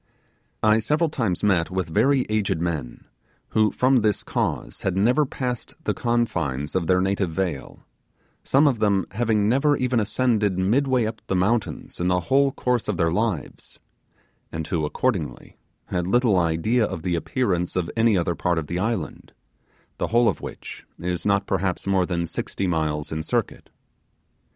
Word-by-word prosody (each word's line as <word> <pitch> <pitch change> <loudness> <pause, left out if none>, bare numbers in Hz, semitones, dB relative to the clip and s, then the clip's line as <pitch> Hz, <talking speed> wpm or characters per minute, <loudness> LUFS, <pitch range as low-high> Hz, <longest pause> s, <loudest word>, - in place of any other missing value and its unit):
I 110 +1 +5
several 150 +7 +1
times 110 - -1
met 90 -5 +2
with 95 -2 -2
very 135 - +3
aged 105 -6 0
men, 80 -8 -4 0.4
who 110 -1 +3
from 130 +4 +3
this 105 -4 +1
cause - - -2
had 95 -1 -1
never 125 +8 +3
passed 125 -3 -4
the - - 0
confines 85 - -1
of 90 -3 0
their 90 0 +3
native 95 -1 0
vale, 85 -4 -4 0.6
some 140 +3 +3
of 135 -6 +2
them 100 -3 +2
having 110 -2 +1
never 140 +5 +3
even 125 -2 +1
ascended 105 -2 +1
midway 125 +5 +2
up 110 0 -5
the 95 - 0
mountains 100 +5 -1
in 90 - 0
the 90 0 +2
whole 135 +7 +3
course 125 -3 -1
of 105 -4 -1
their 80 0 +2
lives, 95 - -3 0.7
and 80 -1 -4
who, 80 -3 -1
accordingly 95 -6 -3 0.3
had 90 -1 -2
little 110 -2 +3
idea 85 +9 +1
of 85 -6 -3
the 90 -1 -1
appearance 90 -1 -1
of 90 -2 -1
any 115 -3 +3
other 85 0 0
part 85 0 0
of 80 - -1
the 85 +4 -3
island, 115 +4 -3 0.7
the - - 0
whole 120 +1 +3
of 100 - 0
which - - -8
is 90 +1 -3
not 100 -1 +2
perhaps 95 -1 -1
more 95 -2 +2
than 85 -2 -1
sixty 95 - -3
miles 80 -4 -1
in 80 0 -2
circuit. 80 - -2
100 Hz, 165 wpm, -24 LUFS, 85-120 Hz, 0.7 s, I